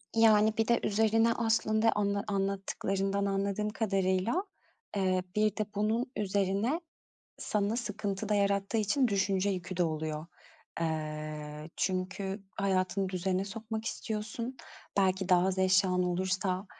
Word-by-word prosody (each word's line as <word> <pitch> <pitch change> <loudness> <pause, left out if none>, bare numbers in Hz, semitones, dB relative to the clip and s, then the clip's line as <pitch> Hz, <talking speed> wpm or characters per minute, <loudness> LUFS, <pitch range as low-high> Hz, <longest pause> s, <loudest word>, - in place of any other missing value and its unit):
Yani, 220 -1 +5
bir 225 - +2
de 235 - +4
üzerine 225 +2 +3
aslında 225 -1 +2
anla 200 -1 0
anlattıklarından 195 0 -1
anladığım 200 +1 0
kadarıyla, 195 - +1 0.5
eee, 185 -2 +1
bir 215 -1 +2
de 215 - 0
bunun 220 +4 0
üzerine 200 - 0 0.6
sana 210 +1 0
sıkıntı 210 -3 -3
da 210 - +3
yarattığı 200 +1 +1
için 220 +5 +2
düşünce 200 -1 +1
yükü 185 -1 -4
de 180 - +3
oluyor. 155 -1 -2 0.6
Eee, 155 -1 -4
çünkü 190 +2 -2
hayatını 190 -1 0
düzene 185 +1 -1
sokmak 220 +1 -5
istiyorsun. 225 +3 -4 0.4
Belki 190 -1 +2
daha 180 0 +5
az 190 0 -1
eşyan 185 -1 +3
olursa, 185 +1 -1
195 Hz, 120 wpm, -31 LUFS, 185-215 Hz, 0.6 s, Yani